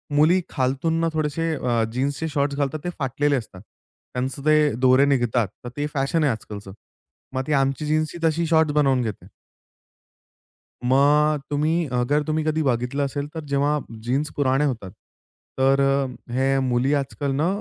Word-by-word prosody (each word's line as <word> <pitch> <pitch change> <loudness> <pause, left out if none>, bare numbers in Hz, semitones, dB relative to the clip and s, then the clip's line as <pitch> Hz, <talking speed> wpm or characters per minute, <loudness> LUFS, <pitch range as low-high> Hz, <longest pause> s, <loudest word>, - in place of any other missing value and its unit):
मुली 165 +5 +4
खालतून 140 +5 0
ना, 165 - +2
थोडेसे 155 +1 -1
अ, 120 -4 0
जीन्सचे 140 +5 -1
शॉर्ट्स 140 -2 -1
घालतात 145 +1 -1
ते 175 - -2
फाटलेले 140 +2 +1
असतात. 105 -7 -6 0.5
त्यांचं 130 +3 -3
ते 155 -3 +4
दोरे 130 +2 +6
निघतात. 120 -5 +1 0.2
तर 120 - -6
ते 145 - -1
फॅशन 145 +3 0
आहे 140 - +3
आजकालचं. 105 -3 -7 0.6
मग 130 - -1
ती 150 - 0
आमची 135 +2 +1
जीन्स 155 +1 0
ही - - -7
तशी 165 +1 0
शॉर्ट्स 160 -2 +3
बनवून 135 -4 +3
घेते. 110 -4 -5 1.6
मग 145 +3 +3
तुम्ही 155 +3 +1
अगर 145 +5 +1
तुम्ही 155 0 0
कधी 155 0 +1
बघितलं 130 +2 0
असेल 140 +1 -4
तर 160 - -4
जेव्हा 145 +2 +2 0.3
जीन्स 135 +5 -1
पुराने 135 0 +2
होतात 115 -9 -3 0.7
तर 135 +1 +4
अ, 135 0 +2 0.3
हे 135 +2 +2
मुली 130 +2 +1
आजकाल 140 0 -2
ना 155 +4 +1
140 Hz, 160 wpm, -23 LUFS, 130-150 Hz, 1.6 s, दोरे